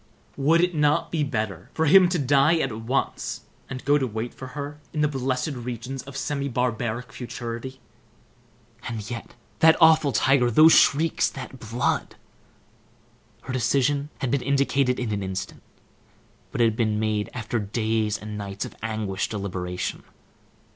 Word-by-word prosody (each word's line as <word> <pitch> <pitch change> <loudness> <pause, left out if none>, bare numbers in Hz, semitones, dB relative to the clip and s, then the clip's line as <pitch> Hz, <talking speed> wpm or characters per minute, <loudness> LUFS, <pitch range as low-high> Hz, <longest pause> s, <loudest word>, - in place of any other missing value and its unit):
Would 160 +5 +3
it 180 0 +1
not 150 +2 +2
be 160 -3 0
better 110 - -3
for 160 - +1
him 180 +3 +7
to 175 - 0
die 145 +3 +4
at 135 -7 -1
once, 115 +5 -2 0.3
and 130 -1 -7
go 145 +1 +4
to 130 - 0
wait 110 +1 -4
for 130 - -9
her 145 +1 -5
in 150 - -1
the 150 - +4
blessed 130 0 -1
regions 125 +1 -5
of 140 0 -9
semi 140 0 -2
barbaric 125 0 -2
futurity? 125 +1 -6 1.1
And 110 -4 -5
yet, 115 - -7 0.2
that 160 0 +6
awful 160 -3 +6
tiger, 130 +1 +3
those 155 +7 +7
shrieks, 160 +3 +4
that 130 -1 -9
blood! 115 +2 -1 1.3
Her 130 - -5
decision 140 +4 +1
had 130 - -1
been 140 - +1
indicated 140 -1 +1
in 120 -3 -2
an 100 -1 -1
instant, 95 0 -5 0.9
but 120 - -1
it - - +6
had 110 -1 +1
been 110 -2 0
made 110 -1 -1
after 115 -1 -2
days 110 0 -1
and 105 0 -7
nights 100 -1 -4
of - - -10
anguished 110 -3 -2
deliberation. 90 -3 -4
125 Hz, 155 wpm, -25 LUFS, 110-140 Hz, 1.3 s, him